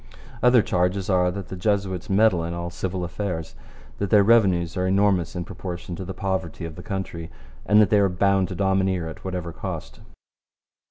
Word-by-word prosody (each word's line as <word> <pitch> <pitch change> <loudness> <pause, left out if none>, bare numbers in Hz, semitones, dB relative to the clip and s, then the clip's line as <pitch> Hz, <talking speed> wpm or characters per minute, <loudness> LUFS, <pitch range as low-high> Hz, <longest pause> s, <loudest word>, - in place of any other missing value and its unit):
Other 125 -2 +5
charges 90 +2 0
are 90 -1 +3
that 95 0 -6
the - - -5
Jesuits 95 -1 -1
meddle 100 -3 +3
in 85 +1 -4
all 85 0 -4
civil 95 +1 -3
affairs, 85 -2 -4 0.5
that 100 - -1
their 105 0 +6
revenues 95 -7 +3
are 90 0 0
enormous 95 -3 +2
in 90 - -2
proportion 90 -1 -6
to 95 - -6
the 95 - -6
poverty 95 -3 -3
of 80 -1 -7
the 90 - -9
country, 90 -4 -5 0.4
and 105 0 +6
that 105 - +4
they 105 - +5
are 100 -1 +3
bound 95 +1 +2
to 95 - -6
domineer 95 -2 +1
at 80 - -9
whatever 90 -3 -4
cost. - - -6
95 Hz, 185 wpm, -24 LUFS, 85-100 Hz, 0.5 s, their